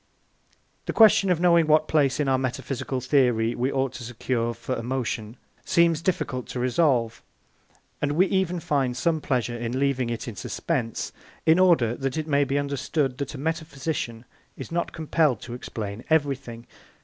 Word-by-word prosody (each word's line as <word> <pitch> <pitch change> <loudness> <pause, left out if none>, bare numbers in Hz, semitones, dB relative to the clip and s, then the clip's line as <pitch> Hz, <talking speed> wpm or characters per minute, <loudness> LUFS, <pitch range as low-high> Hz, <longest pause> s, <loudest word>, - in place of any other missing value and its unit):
The - - -1
question 215 -3 +6
of 180 -3 +2
knowing 170 -2 +4
what 155 0 +4
place 145 -4 +2
in 145 - +1
our 130 -1 +2
metaphysical 130 0 -3
theory 125 -4 +2
we 125 +3 -1
ought 135 -1 -1
to 120 - -8
secure 120 0 -2
for 130 - -4
emotion 115 -2 -3 0.3
seems 170 -2 +3
difficult 140 -8 -2
to 125 - -5
resolve, 125 -3 +1 0.8
and 145 0 0
we 180 +5 +4
even 190 -2 0
find 135 -5 0
some 160 +2 +1
pleasure 120 -4 -1
in 120 +2 -3
leaving 135 -3 +1
it 115 0 -4
in 115 - -6
suspense, 120 - -3 0.3
in 160 +2 +5
order 165 -11 +4
that 135 +2 -3
it 155 - -2
may 145 -2 +2
be 140 +1 -1
understood 140 -1 -1
that 140 +2 -4
a - - -6
metaphysician 150 -6 -3 0.3
is - - -8
not 170 +1 -1
compelled 155 -6 +1
to 120 - -8
explain 110 -3 -6
everything. 135 -6 0
135 Hz, 165 wpm, -25 LUFS, 120-160 Hz, 0.8 s, question